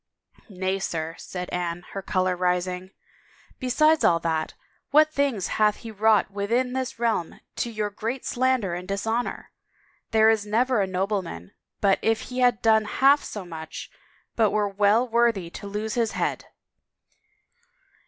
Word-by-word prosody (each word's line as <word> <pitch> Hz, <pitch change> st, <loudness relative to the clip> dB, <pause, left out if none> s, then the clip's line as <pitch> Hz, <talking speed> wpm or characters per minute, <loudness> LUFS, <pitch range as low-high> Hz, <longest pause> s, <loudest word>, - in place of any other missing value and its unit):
" -, -, -28 dB
Nay, 190 Hz, 0 st, -2 dB
sir," 165 Hz, -4 st, -3 dB
said 180 Hz, -1 st, -6 dB
Anne, 175 Hz, -1 st, -3 dB
her 195 Hz, -, -5 dB
color 185 Hz, -1 st, 0 dB
rising, 180 Hz, +1 st, -1 dB, 0.4 s
" -, -, -30 dB
besides 305 Hz, +5 st, +3 dB
all 170 Hz, -, +5 dB
that, 160 Hz, -1 st, -2 dB, 0.3 s
what 310 Hz, +1 st, +5 dB
things 275 Hz, -, 0 dB, 0.2 s
hath 210 Hz, -1 st, +4 dB
he 230 Hz, -, -9 dB
wrought 215 Hz, -2 st, +3 dB
within 235 Hz, +6 st, 0 dB
this 260 Hz, -2 st, -3 dB
realm 230 Hz, -8 st, -1 dB, 0.2 s
to 235 Hz, -, -1 dB
your 215 Hz, -2 st, -3 dB
great 230 Hz, +5 st, -4 dB
slander 255 Hz, -7 st, +1 dB
and 180 Hz, +1 st, -5 dB
dishonor! 225 Hz, +4 st, -2 dB, 0.6 s
There 220 Hz, 0 st, +5 dB
is 220 Hz, -2 st, +1 dB
never 230 Hz, +2 st, +1 dB
a 195 Hz, -, 0 dB
nobleman 185 Hz, -, -3 dB, 0.3 s
but 195 Hz, -2 st, +3 dB
if 225 Hz, 0 st, +1 dB
he 255 Hz, -, -2 dB
had 245 Hz, -2 st, +3 dB
done 220 Hz, -1 st, +4 dB
half 275 Hz, +6 st, +4 dB
so 205 Hz, -3 st, -6 dB
much 160 Hz, -2 st, -8 dB, 0.4 s
but 220 Hz, -3 st, +3 dB
were 210 Hz, 0 st, +1 dB
well 205 Hz, +4 st, +2 dB
worthy 230 Hz, -7 st, +1 dB
to 200 Hz, -, -8 dB
lose 210 Hz, +2 st, -3 dB
his 230 Hz, -2 st, 0 dB
head! -, -, -2 dB
210 Hz, 155 wpm, -25 LUFS, 185-235 Hz, 0.6 s, all